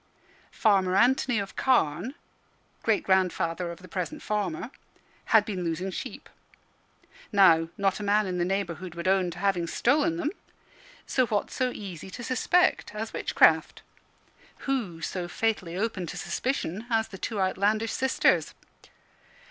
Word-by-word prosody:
Farmer 190 -4 +3
Anthony 245 +2 +3
of 200 0 -4
Carne 230 - +1 0.7
great 220 -2 +1
grandfather 180 -2 +1
of 170 +2 -9
the - - -10
present 180 -2 -4
farmer 210 +1 -2 0.5
had 220 -2 +5
been 190 -4 -3
losing 175 +3 -2
sheep. - - -7 1.0
Now, 165 -6 +5
not 195 0 +1
a - - -5
man 205 +1 +3
in 180 -1 -3
the - - +2
neighbourhood 180 -2 -3
would 170 +1 -4
own 190 -1 +3
to 175 - -8
having 180 -3 0
stolen 305 - +2
them; 315 -3 -1 0.7
so 255 -2 +1
what 210 -2 -1
so 255 -1 0
easy 190 -6 -8
to 240 - -8
suspect 255 0 +1
as 220 +1 -4
witchcraft? - - +3 0.8
Who 225 -12 -2
so 175 +2 -3
fatally 185 -3 -1
open 200 -4 -2
to - - -6
suspicion 235 -5 -3
as 225 -1 +1
the 190 -3 -10
two 220 -3 -3
outlandish 205 +4 +1
sisters? 265 0 +2
195 Hz, 140 wpm, -27 LUFS, 180-225 Hz, 1.0 s, had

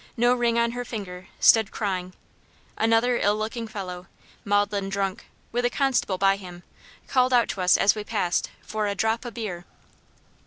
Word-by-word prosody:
no 240 +1 +4
ring 240 -1 +1
on 235 0 +2
her 245 +1 -4
finger, 190 -6 -7
stood 220 -2 +5
crying; 185 -4 -3 0.6
another 225 +2 +2
ill 205 +1 +2
looking 225 +2 -4
fellow, 185 -4 -7 0.4
maudlin 205 -1 0
drunk, 195 -1 -3 0.2
with 245 +1 -1
a 245 - +3
constable 255 -8 0
by 195 +1 +3
him, 180 -2 -11 0.4
called 255 -1 +2
out 240 -1 +4
to 185 +1 -4
us 180 0 +5
as 195 - +4
we 210 - -5
passed 200 -5 -1
for 215 -1 -2
"a 200 - -2
drop 225 +4 0
o' - - -3
beer." 215 -7 -5
210 Hz, 170 wpm, -25 LUFS, 195-235 Hz, 0.6 s, stood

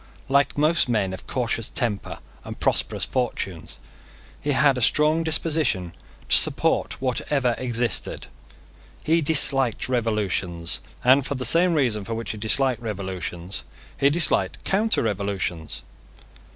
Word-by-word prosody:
Like 140 +1 +2
most 155 -1 +2
men 100 -5 0
of 95 - -9
cautious 115 -3 -2
tempers 115 -6 -2 0.3
and - - -9
prosperous - - 0
fortunes, 105 -9 -3 0.6
he 145 - -1
had 140 0 +4
a 125 - -3
strong 155 +6 +3
disposition 155 - 0 0.3
to - - +5
support - - +2
whatever 130 0 0
existed. 120 -2 -1 0.8
He 165 +2 +2
disliked 135 -6 +4
revolutions; 105 -8 -1 0.2
and, 130 +2 +5
for 140 +2 -3
the 125 -1 -1
same 170 +6 +4
reason 120 -8 0
for 115 +3 -5
which 115 +1 -4
he 110 - -8
disliked 125 +2 0
revolutions, 95 -4 -5 0.3
he 140 - +3
disliked 160 +1 +1
counter 215 +3 +1
revolutions. 100 -6 -3
125 Hz, 125 wpm, -23 LUFS, 105-145 Hz, 0.8 s, to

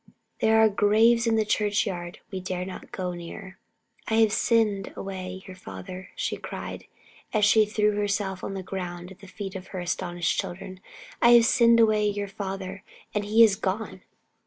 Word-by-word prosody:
There 220 0 +4
are 220 - +7
graves 220 +3 +3
in 225 - +3
the 220 -1 +2
churchyard 205 -5 -1
we 190 - -3
dare 180 0 -4
not 185 - -9
go 180 -2 -3
near. 185 +3 -9 0.5
"I 220 - +1
have 220 -2 +4
sinned 215 -4 +1
away 190 -1 -6
your 185 - -10
father!" 180 - -9
she - - -2
cried, - - -7 0.5
as 210 -2 +4
she 215 0 +5
threw 210 0 +2
herself 200 -2 -1
on 195 - -4
the 190 - -4
earth 175 -1 -5
at 190 - -14
the 195 - -13
feet 195 +1 -7
of 190 0 -7
her 185 - -6
astounded 175 0 -4
children. 185 +2 -2 0.4
"I 235 - +7
have 235 -1 +7
sinned 235 0 +5
away 215 -2 +4
your 205 0 -3
father 195 -1 -6 0.3
and 210 -1 -1
he 220 +3 +6
is 210 -3 +5
gone!" 205 +2 -3
195 Hz, 180 wpm, -26 LUFS, 185-215 Hz, 0.5 s, are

